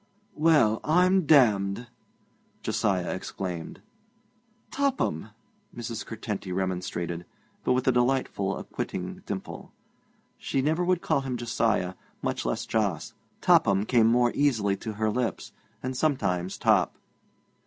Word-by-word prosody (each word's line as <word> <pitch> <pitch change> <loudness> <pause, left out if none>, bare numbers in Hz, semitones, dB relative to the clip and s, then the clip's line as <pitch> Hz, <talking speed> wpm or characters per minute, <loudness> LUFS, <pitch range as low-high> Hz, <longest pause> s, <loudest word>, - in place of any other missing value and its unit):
'Well, 150 -9 +4
I'm 180 +1 +3
damned!' 110 -6 +4 0.8
Josiah 95 -4 0
exclaimed. 90 -2 -5 0.9
'Topham!' 280 0 0 0.5
Mrs. 115 -1 -4
Curtenty 105 -4 -5
remonstrated, 90 -2 -2 0.4
but - - +2
with 130 +1 0
a - - +6
delightful 120 -6 +1
acquitting - - -5
dimple. - - -6 0.7
She 135 - -1
never 155 +6 +1
would 180 0 +1
call 140 - +1
him 130 -2 -3
Josiah, 115 -5 0 0.3
much - - -2
less - - -1
Jos. 105 -7 -1 0.3
Topham 100 +1 +4
came 115 -1 +4
more 120 +1 +4
easily 110 -9 +2
to 110 - -5
her 110 +1 0
lips, 120 0 -2 0.3
and 130 0 -3
sometimes 100 - 0
Top. - - +2
115 Hz, 115 wpm, -27 LUFS, 100-135 Hz, 0.9 s, a